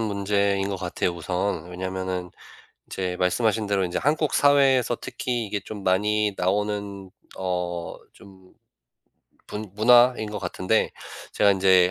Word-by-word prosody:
문제인 100 -2 0
것 100 - -3
같아요 90 0 -2
우선. 90 0 -2
왜냐면은 95 0 -4 0.6
이제 90 -1 -3
말씀하신 105 +4 +1
대로 100 -1 +1
인제 90 - -3
한국 150 +1 +1
사회에서 135 -4 +4
특히 120 -2 -3
이게 100 0 -2
좀 105 0 -8
많이 105 +3 +1
나오는 100 0 -2 0.3
어 90 -2 -3 0.2
좀 95 -1 -18 0.9
분 105 0 -6
문화인 120 0 +4
것 105 - -4
같은데. 95 +3 0 0.4
제가 100 - +4
인제 95 -2 +4
100 Hz, 265 characters per minute, -24 LUFS, 95-110 Hz, 0.9 s, 사회에서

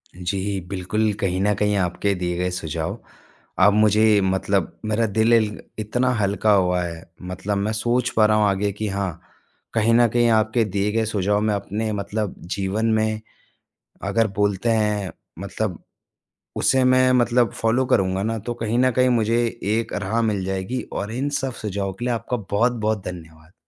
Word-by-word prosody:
जी 95 +2 -2
बिल्कुल, 100 +3 0
कहीं 95 -2 0
न 105 +1 +2
कहीं 105 +1 +1
आपके 95 +2 0
दिए 90 -1 -2
गए 90 0 0
सुझाव 80 -3 -4 0.7
अब 105 - +6
मुझे 105 0 +4
मतलब 95 -1 0
मेरा 110 +2 +1
दिल 110 +3 +2 0.5
इतना 125 +4 0
हल्का 100 +2 +1
हुआ 90 -2 +2
है। 85 -1 -6 0.3
मतलब 100 +2 -2
मैं 100 +2 -1
सोच 120 +3 0
पा 110 - +6
रहा 105 0 +3
हूँ 105 -1 +3
आगे 100 +1 0
कि 105 +1 -4
हाँ, 95 -3 -3 0.5
कहीं 115 +1 +2
न 120 0 +5
कहीं 120 +1 +2
आपके 110 +2 +1
दिए 100 +1 -1
गए 110 +1 +1
सुझाव 105 -1 0
में 105 0 +1
अपने 105 +2 -3
मतलब 105 +1 -3 0.2
जीवन 100 +3 -1
में 110 0 0 0.8
अगर, 115 -1 +1
बोलते 105 +2 0
हैं 105 -3 0 0.3
मतलब 100 -1 -4 0.7
उसे 130 - +3
मैं 130 0 +4
मतलब 120 -1 +3
फ़ॉलो 115 +4 +1
करूँगा 95 -2 +1
ना 115 +1 -1
तो 120 - -1
कहीं 115 0 -1
न 130 +1 +4
कहीं 125 0 +4
मुझे 115 -1 +2 0.2
एक 110 +3 -1
राह 105 +3 -1
मिल 105 -4 0
जाएगी 95 +6 -3
और 105 +2 -4
इन 135 +4 -1
सब 135 -1 -2
सुझाव 100 -2 -2
के 115 +6 -7
लिए 125 -1 +1
आपका 125 +2 -3
बहुत-बहुत 110 -1 0
धन्यवाद। 80 -2 -9
105 Hz, 170 wpm, -22 LUFS, 95-115 Hz, 0.8 s, अब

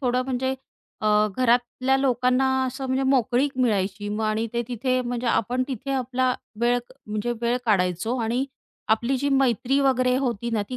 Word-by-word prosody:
थोडं 250 -1 +1
म्हणजे 260 0 -1 0.5
अ, 215 - -1 0.3
घरातल्या 250 +1 +2
लोकांना 255 -1 +2 0.2
असं 265 +1 -4
म्हणजे 260 +1 0
मोकळीक 260 +1 +2
मिळायची. 205 -4 0
मग 210 +1 -2
आणि 215 +1 0
ते 235 0 0
तिथे 255 +1 0
म्हणजे, 245 0 -3
आपण 240 +2 +1
तिथे 265 +1 -5
आपला 255 -1 0 0.3
वेळ 240 +1 +3
क - - -16
म्हणजे 215 +3 -2
वेळ 240 +1 +1
काढायचो 195 +3 +1
आणि 240 +4 0 0.5
आपली 235 +4 -1
जी 280 +2 -1
मैत्री 270 0 +2
वगैरे 255 -2 +2
होती 240 -3 -2
ना, 220 -2 0
ती 255 - -3
250 Hz, 165 wpm, -24 LUFS, 230-260 Hz, 0.5 s, वेळ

